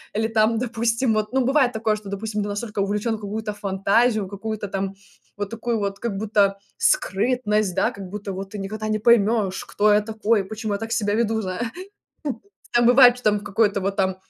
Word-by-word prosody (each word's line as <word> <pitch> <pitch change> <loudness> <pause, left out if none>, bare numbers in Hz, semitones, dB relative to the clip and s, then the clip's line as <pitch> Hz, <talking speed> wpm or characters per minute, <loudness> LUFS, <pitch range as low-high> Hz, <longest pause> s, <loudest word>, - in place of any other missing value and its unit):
Или 220 +1 +1
там 225 0 +2
допустим 230 0 0
вот 215 0 -1
ну 265 -1 +1
бывает 265 -1 +3
такое, 220 -2 0
что, 210 -2 -10
допустим, 210 +1 -3
ты 205 - -3
настолько 210 +1 -4
увлечен 210 +3 0
в - - -14
какую-то 210 +1 -4
фантазию, 205 +2 +1
какую-то 205 +2 -5
там 195 0 -3 0.4
вот 205 -1 -4
такую 230 0 -2
вот 200 -1 -3
как 225 -5 -3
будто 200 -1 +2 0.2
скрытность, 210 -1 +1
да, - - +2
как 200 -5 -9
будто 205 0 -5
вот: 195 +1 -6
"Ты 210 - -6
никогда 215 +2 -4
не 215 0 0
поймешь, 215 -3 +2
кто 210 +1 +2
я 210 0 +5
такой, 220 0 0
почему 215 +1 -4
я 200 - -2
так 225 +1 -6
себя 210 -3 0
веду", 225 -1 +1
зай 185 -2 -4 1.1
Так 240 0 +4
бывает, 245 0 +7
что 250 - -15
там 210 -1 +3
в 205 - -13
какой-то 205 0 +1
вот 195 +1 -2
там, 190 -2 +1
215 Hz, 200 wpm, -23 LUFS, 200-225 Hz, 1.1 s, бывает